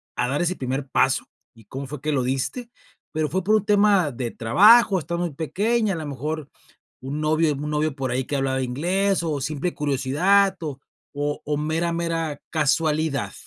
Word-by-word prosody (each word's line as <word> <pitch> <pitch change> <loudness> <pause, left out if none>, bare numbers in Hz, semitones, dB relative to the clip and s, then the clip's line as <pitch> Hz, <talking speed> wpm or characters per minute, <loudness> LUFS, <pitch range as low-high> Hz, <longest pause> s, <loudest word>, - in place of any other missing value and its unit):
a - - 0
dar 145 +5 -1
ese 180 +1 0
primer 135 +1 -3
paso - - +2 0.3
y 115 -2 -18
cómo 135 +1 -6
fue 145 0 -7
que 155 - -1
lo 135 -3 +1
diste?, 135 - -2 0.5
pero 155 -1 0
¿fue 185 +2 -1
por 210 +3 +2
un 210 -1 +1
tema 200 -6 +3
de 120 -1 -4
trabajo?, 200 - +5
estabas 170 +1 -2
muy 145 - -10
pequeña, 210 +6 0
a - - -4
lo 155 -2 -5
mejor 145 +2 -4 0.5
un 140 +4 -4
novio 155 0 +2
un 150 +2 -4
novio 150 -1 -1
por 130 -2 -2
ahí 130 +1 -1
que 145 - -3
hablaba 135 -1 0
inglés, 180 +9 0
o 150 -4 -2
simple 155 +5 -2
curiosidad, 150 +8 +2
o 145 -4 -5 0.4
o 145 +1 -2
o 150 -1 0
mera 160 +3 -1
mera 165 -3 -2
casualidad. 155 -1 0
155 Hz, 185 wpm, -23 LUFS, 140-175 Hz, 0.5 s, trabajo